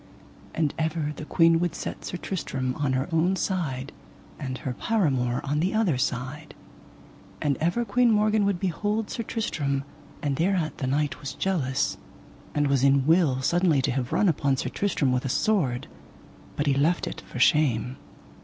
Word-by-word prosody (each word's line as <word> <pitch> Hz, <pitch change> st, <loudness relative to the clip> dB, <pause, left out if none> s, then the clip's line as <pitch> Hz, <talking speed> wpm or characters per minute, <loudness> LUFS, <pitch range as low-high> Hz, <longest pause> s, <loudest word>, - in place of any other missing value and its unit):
And 155 Hz, -3 st, +1 dB
ever 160 Hz, -1 st, -1 dB
the 150 Hz, -, -7 dB
queen 165 Hz, +1 st, +4 dB
would 175 Hz, -1 st, -1 dB
set -, -, -6 dB
Sir 180 Hz, -, -4 dB
Tristram 135 Hz, -9 st, -3 dB
on 140 Hz, -1 st, -1 dB
her 130 Hz, +2 st, 0 dB
own 170 Hz, +4 st, +2 dB
side, 150 Hz, -9 st, -2 dB, 0.5 s
and 130 Hz, -3 st, -4 dB
her 130 Hz, -, -4 dB
paramour 130 Hz, -, 0 dB
on 145 Hz, +2 st, -1 dB
the 185 Hz, +6 st, 0 dB
other 190 Hz, -, +2 dB
side. 130 Hz, +3 st, -3 dB, 0.8 s
And 145 Hz, -2 st, +1 dB
ever 175 Hz, +9 st, 0 dB
Queen 245 Hz, +1 st, +3 dB
Morgan 215 Hz, -1 st, +3 dB
would 200 Hz, -3 st, 0 dB
behold 205 Hz, +4 st, -1 dB
Sir -, -, -3 dB
Tristram, 145 Hz, -12 st, -2 dB, 0.4 s
and 140 Hz, -2 st, 0 dB
thereat 175 Hz, -2 st, 0 dB
the 130 Hz, -, -1 dB
knight 145 Hz, +2 st, 0 dB
was 140 Hz, 0 st, -5 dB
jealous, 145 Hz, -8 st, 0 dB, 0.6 s
and 145 Hz, 0 st, +2 dB
was 140 Hz, -2 st, +2 dB
in 140 Hz, -1 st, +4 dB
will 155 Hz, -5 st, +3 dB
suddenly 170 Hz, 0 st, +3 dB
to 140 Hz, -, +1 dB
have 125 Hz, -1 st, -2 dB
run 210 Hz, -, +3 dB
upon 140 Hz, -5 st, +1 dB
Sir -, -, -2 dB
Tristram 165 Hz, -9 st, 0 dB
with 125 Hz, 0 st, 0 dB
a 135 Hz, -, -2 dB
sword, 145 Hz, -, +1 dB, 0.7 s
but 145 Hz, -, -1 dB
he 140 Hz, -, +3 dB
left 155 Hz, +6 st, +2 dB
it -, -, -6 dB
for -, -, -10 dB
shame. 130 Hz, -3 st, +2 dB
150 Hz, 170 wpm, -26 LUFS, 135-180 Hz, 0.8 s, queen